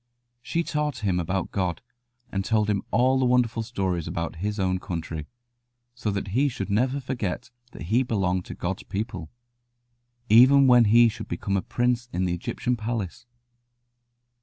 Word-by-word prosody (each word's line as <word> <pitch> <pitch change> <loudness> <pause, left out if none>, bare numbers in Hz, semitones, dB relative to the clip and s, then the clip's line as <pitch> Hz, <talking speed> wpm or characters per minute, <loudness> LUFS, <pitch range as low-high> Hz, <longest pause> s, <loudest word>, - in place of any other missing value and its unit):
She 165 +6 -1
taught 150 -7 -2
him 90 -3 +1
about 90 +2 -2
God, 90 -5 -1 0.5
and 95 0 -1
told 105 0 +1
him 100 - 0
all 130 +3 +3
the 130 - +2
wonderful 125 -2 +2
stories 95 -7 -2
about 85 0 -4
his 105 +4 -3
own 95 -1 +1
country, 80 -4 -5 0.7
so 120 -3 -3
that 100 -1 -3
he 135 +8 +2
should 100 -5 -5
never 130 +6 +1
forget 125 -4 -4 0.2
that - - -8
he 110 +9 +2
belonged 95 -7 0
to - - -8
God's 95 +2 -3
people, 95 -6 -5 1.0
even 130 +5 +7
when 125 -2 +6
he 115 +3 +6
should 110 0 -5
become 100 -2 -2
a 95 - +1
prince 120 +2 -1
in 90 +1 -1
the 90 - 0
Egyptian 120 +8 -2
palace. 115 0 -4
110 Hz, 160 wpm, -25 LUFS, 95-125 Hz, 1.0 s, even